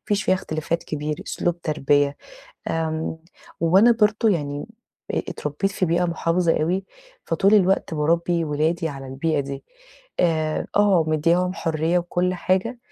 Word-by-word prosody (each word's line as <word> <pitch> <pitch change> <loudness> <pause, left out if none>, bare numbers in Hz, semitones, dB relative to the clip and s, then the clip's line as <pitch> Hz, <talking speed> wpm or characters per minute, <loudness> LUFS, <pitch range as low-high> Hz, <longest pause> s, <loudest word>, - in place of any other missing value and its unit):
فيش 200 - -2
فيها 185 - +3
اختلافات 160 -1 -3
كبير، 150 0 -3
أسلوب 175 0 -2
تربية، 145 -2 +1 0.5
آمم 160 0 -2 0.4
وأنا 190 +8 +5
برضه 220 0 +2
يعني 145 -5 -2 0.5
آآ - - 0
اتربيت 150 +7 -2
في 185 - 0
بيئة 170 +2 +1
مُحافظة 170 -1 +1
أوي، 185 +4 0 0.4
فطول 195 +5 +3
الوقت 190 -4 +2
باربي 170 +2 +1
ولادي 160 +2 0
على 135 -2 -7
البيئة 145 +3 -1
دي، 140 0 -6 0.6
آآ 155 -3 0
آه، 200 -5 +4
مدياهم 170 +4 +2
حرية 165 +1 0
وكُلّ 175 +1 -1
حاجة، 190 +7 0
165 Hz, 135 wpm, -23 LUFS, 155-180 Hz, 0.6 s, وأنا